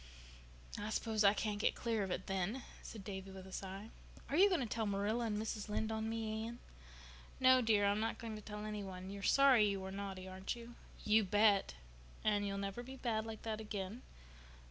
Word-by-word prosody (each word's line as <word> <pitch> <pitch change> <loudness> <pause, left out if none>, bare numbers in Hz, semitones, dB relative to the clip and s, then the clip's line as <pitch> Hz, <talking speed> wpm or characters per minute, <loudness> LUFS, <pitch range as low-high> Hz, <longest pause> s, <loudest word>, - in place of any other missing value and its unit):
"I 205 +1 -3
s'pose 220 0 +1
I 200 +1 +6
can't 210 -1 -1
get - - +2
clear 230 -3 0
of 195 - -1
it 180 - -2
then," 195 +6 -1 0.2
said 215 -4 -8
Davy 190 0 -6
with 190 -1 -9
a 190 - -11
sigh. 195 +3 -6 0.4
"Are - - +1
you 390 +5 +7
going 360 -6 +2
to - - 0
tell 220 -1 -1
Marilla 205 +4 0
and 210 -1 -1
Mrs. 215 -1 -3
Lynde 220 +1 -1
on 220 0 -1
me, 220 -1 -2
Anne?" 235 +1 -7 0.8
"No, 255 0 +7
dear, 215 -3 +4
I'm 200 +1 +3
not 225 +1 -1
going 225 -2 -5
to 215 - -7
tell 210 0 -6
any 210 -1 -3
one. 190 0 -7
You 200 - -6
are - - -8
sorry 265 -1 +6
you 200 -1 -1
were 190 0 -5
naughty, 195 -1 -5
aren't 190 +3 -4
you?" 235 0 -10 0.3
"You 215 +1 +5
bet!" 205 - +4 0.5
"And 205 -1 +2
you'll 195 0 -2
never 200 +3 -3
be 260 +2 -8
bad 225 -4 -1
like 220 -1 -7
that 220 -1 -3
again." 210 +2 -4
215 Hz, 215 wpm, -37 LUFS, 195-225 Hz, 0.8 s, you